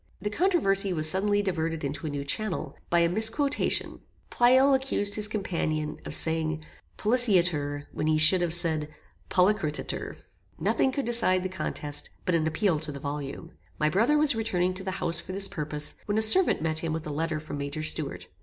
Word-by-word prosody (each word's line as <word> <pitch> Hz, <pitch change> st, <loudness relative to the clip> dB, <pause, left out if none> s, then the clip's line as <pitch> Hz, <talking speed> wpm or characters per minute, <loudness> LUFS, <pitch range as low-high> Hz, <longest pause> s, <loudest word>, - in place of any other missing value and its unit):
The 210 Hz, +3 st, -4 dB
controversy 200 Hz, -, +1 dB
was 155 Hz, -2 st, +2 dB
suddenly 205 Hz, +4 st, +1 dB
diverted 165 Hz, -4 st, -3 dB
into 145 Hz, +3 st, -5 dB
a -, -, -3 dB
new 145 Hz, -1 st, -5 dB
channel, 205 Hz, +7 st, -3 dB
by 170 Hz, 0 st, +2 dB
a 170 Hz, -, +3 dB
misquotation. 225 Hz, -, 0 dB, 0.3 s
Pleyel 260 Hz, +3 st, +4 dB
accused 265 Hz, -6 st, 0 dB
his 210 Hz, 0 st, +3 dB
companion 160 Hz, -7 st, -3 dB
of -, -, -4 dB
saying 160 Hz, -1 st, +3 dB, 0.3 s
"polliciatur" 175 Hz, -, +2 dB
when 155 Hz, -, -4 dB
he 155 Hz, 0 st, +2 dB
should 160 Hz, +4 st, +6 dB
have 175 Hz, -2 st, -1 dB
said 160 Hz, -3 st, +2 dB, 0.4 s
"polliceretur." 180 Hz, -5 st, -1 dB, 0.4 s
Nothing 265 Hz, -, 0 dB
would 280 Hz, -, -1 dB
decide 225 Hz, -6 st, +2 dB
the 185 Hz, -, -3 dB
contest, 150 Hz, -5 st, -3 dB, 0.2 s
but 180 Hz, -, -1 dB
an 160 Hz, -1 st, +1 dB
appeal 170 Hz, 0 st, 0 dB
to 155 Hz, -1 st, -3 dB
the 140 Hz, -, -8 dB
volume. 145 Hz, +3 st, -7 dB, 0.3 s
My 155 Hz, -, +1 dB
brother 230 Hz, -, +2 dB
was 300 Hz, -2 st, +3 dB
returning 185 Hz, -5 st, -1 dB
to 190 Hz, +1 st, -6 dB
the 190 Hz, -, -4 dB
house 170 Hz, -3 st, +2 dB
for 185 Hz, -, -8 dB
this 195 Hz, +1 st, 0 dB
purpose, 150 Hz, -2 st, -2 dB
when 205 Hz, +1 st, -1 dB
a 220 Hz, -, +3 dB
servant 335 Hz, -, +4 dB
met 160 Hz, -1 st, 0 dB
him 160 Hz, -1 st, -4 dB
with 160 Hz, 0 st, -5 dB
a 150 Hz, -, -5 dB
letter 160 Hz, +1 st, -3 dB
from 150 Hz, -1 st, -8 dB
Major 140 Hz, +2 st, -5 dB
Stuart. 155 Hz, -2 st, -4 dB
175 Hz, 185 wpm, -26 LUFS, 155-210 Hz, 0.4 s, should